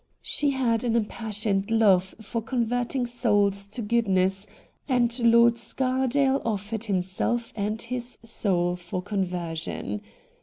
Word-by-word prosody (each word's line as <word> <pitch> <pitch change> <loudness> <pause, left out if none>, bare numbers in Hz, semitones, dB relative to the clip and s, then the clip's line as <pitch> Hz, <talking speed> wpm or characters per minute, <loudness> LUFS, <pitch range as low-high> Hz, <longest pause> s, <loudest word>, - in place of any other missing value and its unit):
She 290 - +1
had 250 -4 +1
an 235 -2 +1
impassioned 210 -2 -1
love 195 -5 +3
for 225 +2 -3
converting 245 +2 -1
souls 205 -5 +1
to 220 +3 -6
goodness, 195 -3 +1 0.4
and 240 -2 +2
Lord 235 0 +5
Scardale 265 +2 +1
offered 215 0 -2
himself 195 +4 -1
and 215 +1 -2
his 245 +1 -5
soul 180 -6 0
for 180 +1 -5
con 200 0 -1
version. 165 - -3
225 Hz, 120 wpm, -26 LUFS, 195-240 Hz, 0.4 s, Lord